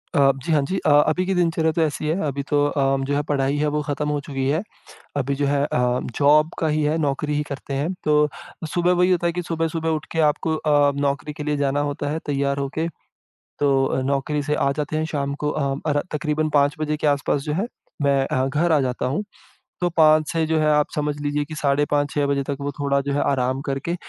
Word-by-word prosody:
अ, 140 Hz, -1 st, +5 dB
जी, 170 Hz, -, -1 dB
हाँ 150 Hz, -2 st, +4 dB
जी 190 Hz, -, -1 dB
अ, -, -, +4 dB
अभी 155 Hz, +5 st, +4 dB
की 190 Hz, -, 0 dB
दिनचर्या 165 Hz, -2 st, +2 dB
तो 165 Hz, -, -1 dB
ऐसी 155 Hz, -1 st, -1 dB
है। 160 Hz, +5 st, 0 dB
अभी 140 Hz, 0 st, -3 dB
तो 145 Hz, -1 st, +3 dB
अ, 135 Hz, -1 st, +1 dB
जो 140 Hz, +1 st, -1 dB
है 145 Hz, -, +1 dB
पढ़ाई 140 Hz, -1 st, 0 dB
है 150 Hz, +1 st, +1 dB
वो 150 Hz, -, 0 dB
ख़त्म 150 Hz, +1 st, -1 dB
हो 150 Hz, 0 st, 0 dB
चुकी 135 Hz, -2 st, -2 dB
है। 155 Hz, +4 st, +1 dB, 0.6 s
अभी 140 Hz, 0 st, 0 dB
जो 140 Hz, +1 st, 0 dB
है 140 Hz, 0 st, +1 dB
अ, 125 Hz, -2 st, 0 dB, 0.2 s
जॉब 150 Hz, +2 st, +5 dB
का 160 Hz, -, +1 dB
ही 155 Hz, 0 st, +1 dB
है, 150 Hz, +2 st, +1 dB
नौकरी 150 Hz, 0 st, -1 dB
ही 150 Hz, -, +1 dB
करते 140 Hz, 0 st, -5 dB
हैं, 145 Hz, +6 st, -1 dB
तो 150 Hz, 0 st, +3 dB, 0.4 s
सुबह 175 Hz, 0 st, +2 dB
वही 180 Hz, +1 st, +3 dB
होता 175 Hz, -1 st, +2 dB
है 170 Hz, -, +1 dB
कि 180 Hz, +1 st, -3 dB
सुबह-सुबह 165 Hz, -1 st, -2 dB
उठ 155 Hz, -1 st, -2 dB
के 165 Hz, -, 0 dB
आपको 160 Hz, +2 st, -2 dB
अ, 145 Hz, -2 st, +3 dB
नौकरी 145 Hz, +1 st, -1 dB
के 150 Hz, -, -7 dB
लिए 150 Hz, 0 st, 0 dB
जाना 140 Hz, 0 st, 0 dB
होता 145 Hz, 0 st, -4 dB
है 155 Hz, -, -1 dB
तैयार 140 Hz, -1 st, 0 dB
होके। 140 Hz, +4 st, -2 dB, 0.7 s
तो 135 Hz, -2 st, +2 dB
नौकरी 140 Hz, +2 st, 0 dB
से 150 Hz, +1 st, 0 dB
आ 140 Hz, -, +1 dB
जाते 150 Hz, +1 st, -3 dB
हैं 155 Hz, -, 0 dB
शाम 140 Hz, -3 st, -2 dB
को 150 Hz, -, +1 dB
अ, 140 Hz, -2 st, -1 dB
अर 145 Hz, 0 st, +2 dB
तकरीबन 155 Hz, +1 st, -1 dB
5 145 Hz, -1 st, +3 dB
बजे 150 Hz, 0 st, -1 dB
के 150 Hz, -, 0 dB
आस-पास 145 Hz, 0 st, +1 dB
जो 150 Hz, -, -2 dB
है 195 Hz, +8 st, -1 dB, 0.3 s
मैं 140 Hz, -1 st, +2 dB
अ, 130 Hz, -, 0 dB
घर 155 Hz, +5 st, +1 dB
आ 155 Hz, -, +4 dB
जाता 125 Hz, -1 st, -2 dB
हूँ। 140 Hz, +11 st, -1 dB, 0.6 s
तो 175 Hz, -, +2 dB
5 155 Hz, -1 st, +5 dB
से 165 Hz, -1 st, +1 dB
जो 160 Hz, 0 st, +1 dB
है 155 Hz, -, +2 dB
आप 150 Hz, 0 st, +3 dB
समझ 150 Hz, 0 st, -1 dB
लीजिए 145 Hz, 0 st, -1 dB
कि 155 Hz, -, -8 dB
साढ़े 145 Hz, -1 st, +1 dB
5 145 Hz, -1 st, +1 dB
6 145 Hz, -1 st, +1 dB
बजे 140 Hz, 0 st, 0 dB
तक 140 Hz, +1 st, -3 dB
वो 140 Hz, 0 st, -2 dB
थोड़ा 140 Hz, -1 st, +1 dB
जो 140 Hz, -, 0 dB
है 145 Hz, -, 0 dB
आराम 130 Hz, -1 st, 0 dB
करके 135 Hz, +5 st, -2 dB
145 Hz, 240 wpm, -22 LUFS, 140-155 Hz, 0.7 s, अ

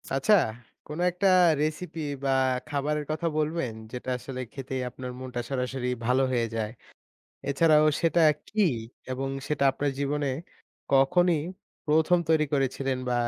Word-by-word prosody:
আচ্ছা, 135 Hz, +11 st, +3 dB, 0.5 s
কোনো 150 Hz, +3 st, -5 dB
একটা 180 Hz, +3 st, +1 dB, 0.3 s
recipe 155 Hz, +2 st, -3 dB, 0.3 s
বা -, -, +1 dB, 0.4 s
খাবারের 150 Hz, +1 st, -1 dB
কথা 165 Hz, +2 st, -1 dB
বলবেন? 155 Hz, -6 st, -1 dB, 0.2 s
যেটা 125 Hz, 0 st, -6 dB
আসলে 130 Hz, +1 st, -7 dB
খেতেই 130 Hz, -1 st, -4 dB
আপনার 125 Hz, 0 st, -7 dB
মনটা 125 Hz, -1 st, -4 dB
সরাসরি 130 Hz, -1 st, -2 dB, 0.2 s
ভালো 130 Hz, +3 st, +3 dB
হয়ে 120 Hz, -2 st, +1 dB
যায়? 110 Hz, -1 st, -2 dB, 0.8 s
এছাড়াও 155 Hz, +1 st, +5 dB
সেটা 170 Hz, 0 st, +3 dB, 0.3 s
কী? 215 Hz, -, 0 dB, 0.5 s
এবং 135 Hz, +1 st, -2 dB, 0.2 s
সেটা 150 Hz, -2 st, 0 dB
আপনার 140 Hz, +1 st, -1 dB
জীবনে 145 Hz, +1 st, 0 dB, 0.6 s
কখনই 165 Hz, +5 st, +4 dB, 0.5 s
১ম 160 Hz, +3 st, +4 dB
তৈরি 160 Hz, -1 st, +4 dB
করেছিলেন 135 Hz, -1 st, 0 dB
বা -, -, +1 dB
140 Hz, 130 wpm, -27 LUFS, 130-155 Hz, 0.8 s, এছাড়াও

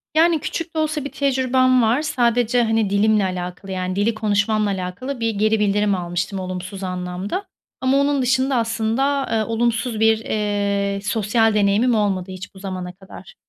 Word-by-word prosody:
Yani, 325 Hz, 0 st, +4 dB
küçük 330 Hz, +2 st, -5 dB
de -, -, 0 dB
olsa 310 Hz, -2 st, -1 dB
bir 285 Hz, -, -5 dB
tecrübem 255 Hz, -2 st, +2 dB
var. 230 Hz, +5 st, +2 dB
Sadece, 245 Hz, -5 st, +2 dB
hani, 225 Hz, -2 st, +1 dB
dilimle 210 Hz, +1 st, +3 dB
alakalı, 180 Hz, +1 st, -5 dB
yani, 185 Hz, 0 st, -3 dB
dili 205 Hz, +4 st, +1 dB
konuşmamla 215 Hz, 0 st, +1 dB
alakalı 195 Hz, +8 st, -4 dB
bir 230 Hz, 0 st, 0 dB
geri 215 Hz, +2 st, +2 dB
bildirim 205 Hz, 0 st, +2 dB
almıştım 180 Hz, +2 st, -3 dB
olumsuz 185 Hz, +1 st, -6 dB
anlamda. 180 Hz, -, -4 dB, 0.4 s
Ama 260 Hz, +1 st, +2 dB
onun 280 Hz, 0 st, +2 dB
dışında, 260 Hz, +1 st, +1 dB
aslında, 230 Hz, +4 st, 0 dB
eee, 220 Hz, -1 st, +1 dB
olumsuz 230 Hz, 0 st, -1 dB
bir, 220 Hz, 0 st, +4 dB
eee, 200 Hz, -2 st, -1 dB
sosyal 220 Hz, +1 st, +1 dB
deneyimim 210 Hz, +4 st, +3 dB
olmadı 195 Hz, -3 st, 0 dB
hiç 185 Hz, 0 st, -9 dB
bu -, -, -12 dB
zamana 185 Hz, -2 st, -5 dB
kadar. 195 Hz, -, -13 dB
215 Hz, 160 wpm, -21 LUFS, 195-250 Hz, 0.4 s, Yani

